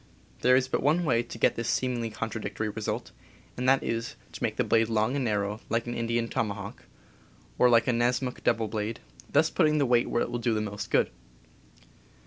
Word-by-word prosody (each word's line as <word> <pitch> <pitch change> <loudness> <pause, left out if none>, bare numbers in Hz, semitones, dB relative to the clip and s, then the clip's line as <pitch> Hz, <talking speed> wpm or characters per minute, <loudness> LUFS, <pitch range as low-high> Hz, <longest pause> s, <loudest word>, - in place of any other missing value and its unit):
There 125 0 +5
is 130 0 +2
but - - -1
one 160 +6 +2
way 115 -6 +3
to 120 - -9
get - - +3
this 115 -1 -3
seemingly 120 -3 0
contradictory 110 0 -4
result, 105 0 -4 0.4
and 125 +1 +1
that 135 0 +4
is 115 0 -3 0.2
to - - -10
make - - -1
the - - +1
blade 115 0 +2
long 110 +3 +1
and 140 - 0
narrow, 105 -2 -1
like 115 0 0
an 120 - -4
Indian 115 0 -1
toma 105 -3 -1
hawk, 100 -1 -9 0.7
or 125 - +6
like 115 -1 +4
a 125 - +3
Nessmuk 125 +2 0
double 115 -2 +2
blade, 110 +1 -3 0.3
thus - - +3
putting 155 0 +3
the 145 - +3
weight 120 -1 +3
where 120 - +1
it - - -5
will 120 - -2
do 115 -1 0
the - - +1
most 105 -1 -5
good. - - +2
115 Hz, 210 wpm, -28 LUFS, 110-125 Hz, 0.7 s, or